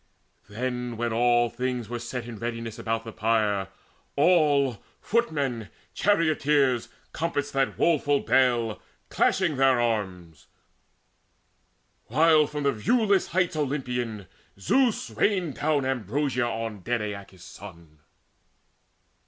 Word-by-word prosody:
Then, 125 +1 -4
when 120 0 -1
all 120 +1 +3
things 125 0 -3
were 120 0 -4
set 120 0 -5
in 115 -3 -8
readiness 115 -1 -5
About 115 0 -2
the 115 - -8
pyre, 105 -3 0 0.5
all, 145 - +3 0.2
footmen, 140 - -1 0.2
charioteers, 145 - +2 0.2
Compassed 145 -3 -2
that 135 -1 0
woeful 145 -4 +2
bale, 120 -4 +2 0.3
clashing 170 -7 +1
their 135 -2 +4
arms, 95 -9 -3 1.6
While, 155 +3 +4
from 150 0 -5
the 140 - +3
viewless 200 - +2
heights 180 -2 0
Olympian, 125 -8 -3 0.3
Zeus 245 - +1
Rained 185 -8 0
down 145 -3 +1
ambrosia 130 +1 -1
on 115 -2 -4
dead 115 +4 -2
Aeacus' 100 -3 -8
son. 80 -2 -13
125 Hz, 110 wpm, -26 LUFS, 115-145 Hz, 1.6 s, their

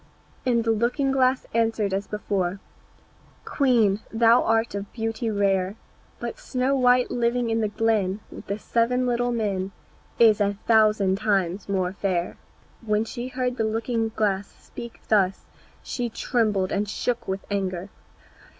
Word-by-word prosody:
And 235 -2 +3
the 225 - +2
looking 245 +5 +1
glass 260 -1 +2
answered 225 -3 +1
as 195 +1 -2
before, 195 -3 -2 0.9
"Queen, 230 -8 +2
thou 230 +1 +5
art 225 +1 +1
of 200 0 -5
beauty 225 0 -2
rare, 195 -2 +1 0.4
But - - -5
Snow 265 - 0
white 250 -1 +3
living 240 0 0
in 225 0 +1
the 215 - +1
glen 210 -2 0
With - - -10
the 200 - -2
seven 235 +3 +1
little 245 0 +1
men 200 -5 -1 0.5
Is 220 -3 +5
a 200 0 +1
thousand 210 -4 +4
times 195 -3 0
more 185 -2 0
fair." 185 -3 -2 0.5
When 215 0 +1
she 240 +2 -5
heard 255 -1 -2
the 225 - +1
looking 225 +1 -1
glass 200 -2 0
speak 235 -1 -11
thus 195 -3 +2 0.4
she 245 -1 -3
trembled 215 -5 0
and 205 +1 -1
shook 235 +2 -2
with 190 +1 -3
anger. 190 -1 -2
220 Hz, 145 wpm, -25 LUFS, 200-235 Hz, 0.9 s, thou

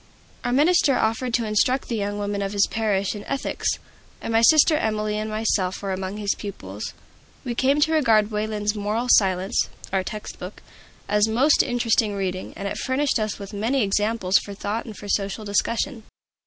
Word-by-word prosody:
Our 245 - -1
minister 290 0 +4
offered 225 +3 0
to 235 - 0
instruct 235 +5 +1
the 230 - -2
young 205 0 -2
people 205 0 -2
of 195 0 -3
his 200 -1 +4
parish 205 -3 0
in 205 -1 -7
ethics, 275 -1 -2 0.4
and 225 - -4
my 225 - +4
sister 310 +5 +6
Emilie 215 -5 -1
and 215 0 -3
myself 215 -4 0
were 195 -1 -4
among 190 +2 -4
his 205 -2 0
pupils. 105 - -7 0.5
We 245 - -2
came 270 +4 +2
to 315 - +3
regard 225 -8 +3
Wayland's 210 0 -1
"Moral 215 +4 -2
Science" 190 -1 +3 0.2
(our 190 -1 +2
text 210 +3 -7
book) - - -9 0.4
as 210 +1 +3
most 260 +7 +4
interesting 230 -4 +1
reading, 185 -1 -3
and 200 - -4
it - - -4
furnished 265 0 0
us 215 -1 -2
with 200 0 -9
many 225 +3 0
subjects 205 -2 +2
for 200 - -8
thought 210 +3 -3
and 220 -4 -9
for 205 - -9
social 200 +2 -1
discussion. 230 +5 -1
215 Hz, 180 wpm, -23 LUFS, 200-235 Hz, 0.5 s, sister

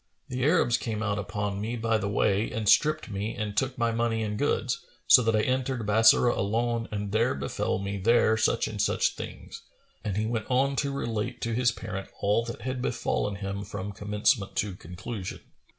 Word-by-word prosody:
The 125 -1 -2
Arabs 140 -6 +3
came 110 -2 -3
out 100 -1 -1
upon 100 0 -3
me 115 +3 -2
by 115 -1 +1
the 100 0 -2
way 100 +1 +1
and 110 -2 -3
stripped 155 +6 +3
me 100 +3 -3
and 105 -1 -4
took 130 -1 0
my 115 -1 +1
money 115 -1 0
and 105 -1 -2
goods, 125 0 0 0.2
so 125 - +8
that 115 -2 +2
I 110 - +3
entered 130 -2 -1
Bassorah 110 +3 +5
alone 115 +3 -1
and 105 -1 -3
there 110 -8 +2
befel 70 +1 -2
me 100 +1 -3
there 110 +2 +4
such 110 +1 +1
and 105 -2 -3
such - - +2
things;" - - -8 0.4
and 100 -2 -2
he 110 - 0
went 110 -2 -2
on 135 +2 +2
to 140 -1 0
relate 115 -6 -3
to 115 - -1
his 120 +1 +3
parent 95 -4 -6
all 105 +3 +2
that 115 +2 -6
had 130 0 -3
befallen 120 -5 -1
him 100 0 -4
from 100 -1 -5
commencement 105 +1 0
to 100 -2 -1
conclusion. 90 +3 -7
110 Hz, 195 wpm, -27 LUFS, 100-120 Hz, 0.4 s, so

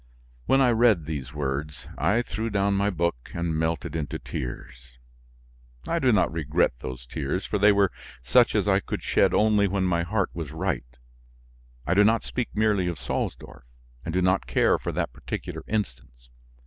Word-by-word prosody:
When 135 - +4
I 125 -2 +5
read 110 -8 +3
these 70 -4 -5
words, 75 0 -4
I 115 +4 +1
threw 110 +1 -3
down 100 -1 +1
my 100 +1 +2
book, 85 -9 -2
and 85 -2 -1
melted 80 +1 -2
into 75 -3 -3
tears. - - -7 0.9
I 170 - 0
do 130 -5 +3
not 105 -4 +3
regret 80 +1 +1
those 65 -1 -7
tears 70 +9 -3
for 105 - -1
they 105 +1 +6
were 100 -2 +3 0.3
such 60 - +4
as - - +1
I - - +4
could - - -5
shed - - +3
only 105 -1 +3
when 95 0 0
my 85 -2 +1
heart 95 +3 -1
was 80 -4 -5
right; 80 -8 -3 0.9
I 85 - +1
do 100 +3 +5
not 115 +2 +3
speak 125 -2 -3
merely 105 -4 +2
of 85 -2 -3
Salsdorf, 65 -1 -4 0.4
and 80 - -4
do 90 +2 +1
not 95 +1 +2
care - - +3
for - - -3
that - - -2
particular - - -6
instance. - - -4
85 Hz, 175 wpm, -26 LUFS, 70-105 Hz, 0.9 s, they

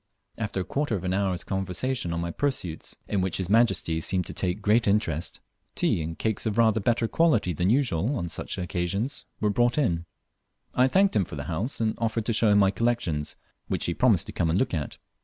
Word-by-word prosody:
After 105 -4 -2
a - - -2
quarter 140 +2 -1
of 95 - -4
an 90 0 -1
hour's 95 -2 0
conversation 95 +3 -2
on 85 - -2
my 85 0 -3
pursuits, 110 - -3
in 100 -2 0
which 95 -2 -1
his 95 0 -2
Majesty 95 -8 +3
seemed 90 +2 0
to - - -6
take 90 +1 -1
great 110 +3 +3
interest, 95 -6 0 0.3
tea - - +1
and 80 +1 -5
cakes 110 0 -1
of 110 0 -2
rather 110 -2 +4
better 115 +2 +1
quality 115 - +2
than 90 +4 0
usual 120 - +1
on 85 -8 -2
such 80 - -5
occasions 95 +8 -2
were 105 -1 +1
brought 120 +5 +2
in. 85 - +1 0.7
I 125 +1 +4
thanked 195 +7 +3
him 100 -4 +3
for - - -8
the 70 - -5
house, 85 - -2
and 110 -1 +1
offered 115 -1 -1
to 115 - 0
show 110 0 +3
him 100 - +5
my 100 -1 +5
collections, 100 -10 -1 0.3
which - - -1
he - - 0
promised - - +3
to - - -7
come 85 - 0
and 80 - +2
look 130 - 0
at. 75 -5 -3
100 Hz, 215 wpm, -26 LUFS, 85-115 Hz, 0.7 s, him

